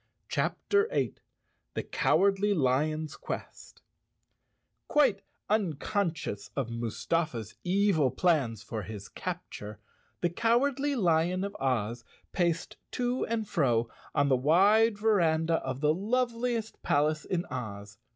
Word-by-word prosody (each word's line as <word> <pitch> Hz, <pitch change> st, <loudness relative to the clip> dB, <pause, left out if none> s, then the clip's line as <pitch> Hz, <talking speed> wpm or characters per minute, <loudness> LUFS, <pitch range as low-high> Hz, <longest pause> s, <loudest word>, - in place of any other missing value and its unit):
CHAPTER 410 Hz, +1 st, +1 dB
8 -, -, -1 dB, 0.6 s
The -, -, -1 dB
Cowardly 195 Hz, +8 st, +2 dB
Lion's 155 Hz, +2 st, +1 dB
Quest -, -, -8 dB, 1.1 s
Q 295 Hz, -, +3 dB
UITE 245 Hz, -9 st, +4 dB, 0.3 s
unconscious 175 Hz, -, -1 dB
of 130 Hz, -4 st, -2 dB
Mustafa's 115 Hz, +1 st, -2 dB
evil 185 Hz, -6 st, +3 dB
plans 135 Hz, -, +1 dB
for 110 Hz, -, -4 dB
his 100 Hz, 0 st, -8 dB
capture, 105 Hz, 0 st, -6 dB, 0.4 s
the 175 Hz, -, +1 dB
Cowardly 270 Hz, +7 st, +2 dB
Lion 180 Hz, -3 st, +2 dB
of 200 Hz, 0 st, -4 dB
Oz 120 Hz, -3 st, -1 dB, 0.3 s
paced 170 Hz, -2 st, -1 dB, 0.2 s
to 245 Hz, +1 st, 0 dB
and 220 Hz, -2 st, -1 dB
fro 120 Hz, -, +1 dB, 0.3 s
on 140 Hz, -, +3 dB
the 135 Hz, -, +4 dB
wide 200 Hz, -, +4 dB
veranda 165 Hz, -6 st, +2 dB
of 130 Hz, -2 st, -4 dB
the 150 Hz, 0 st, +4 dB
loveliest 230 Hz, +3 st, -1 dB
palace 150 Hz, +2 st, +1 dB
in 175 Hz, -2 st, -2 dB
Oz. 105 Hz, -4 st, -6 dB
165 Hz, 115 wpm, -29 LUFS, 130-210 Hz, 1.1 s, UITE